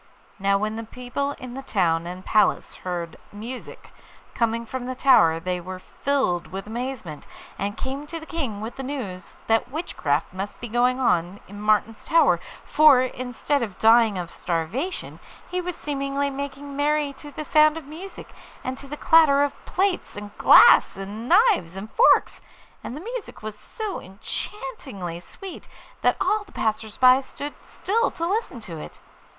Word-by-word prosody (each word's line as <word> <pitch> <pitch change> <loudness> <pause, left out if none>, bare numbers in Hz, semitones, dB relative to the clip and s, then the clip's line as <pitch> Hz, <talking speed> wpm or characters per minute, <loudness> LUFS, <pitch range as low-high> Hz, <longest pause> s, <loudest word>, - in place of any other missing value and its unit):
Now 195 0 +3
when 215 +2 -2
the 225 - -4
people 250 +5 -4
in 255 -3 -9
the 270 - -5
town 170 -9 +1
and 180 +1 -7
palace 215 - +2
heard 175 -3 -5
music 230 +5 -8 0.4
coming 230 0 0
from 250 +1 -5
the 255 - -3
tower 170 - +5
they 180 +1 -2
were 185 +2 -6
filled 185 -3 -1
with 195 +1 -6
amazement, 225 - -5 0.3
and 205 +1 -2
came 275 +3 -4
to 330 +2 -5
the 320 - -10
King 270 -12 -3
with 225 +2 -6
the - - -4
news 250 -10 -6
that 225 +2 +2
witchcraft 170 - -2
must 195 +2 -5
be 240 - -6
going 245 +3 +2
on 180 -5 +1
in 205 +1 -9
Martin's 215 +1 +1
Tower, 330 0 +4 0.3
for, 300 -4 +6
instead 255 +3 -2
of 205 -6 -4
dying 225 -2 +5
of 175 -2 -5
starvation, 190 - -3 0.3
he 365 0 0
was 360 -1 -4
seemingly 280 -1 -2
making 280 +1 -6
merry 295 0 +1
to 295 - -10
the 300 +2 -7
sound 305 +1 +5
of 320 - -8
music, 335 +7 -9 0.3
and 260 +1 -4
to 280 - -11
the 295 +2 -6
clatter 295 -4 +5
of 285 - 0
plates, 375 - -1
and 205 0 -8
glass, - - +7
and 205 +5 -6
knives 370 - +4
and 200 +3 -7
forks; 485 - +4 0.4
and 255 - -6
the - - -7
music 470 - -7
was 215 -1 -5
so 425 - -6
enchantingly 195 - -6
sweet 380 - -10 0.3
that - - +3
all 415 +3 +1
the 410 - -20
passers 220 -1 -2
by 255 +1 +6
stood 285 +2 -7
still 455 +5 0
to 335 - -4
listen 390 - -1
to 170 -8 -8
it. - - -10
250 Hz, 170 wpm, -24 LUFS, 200-290 Hz, 0.4 s, glass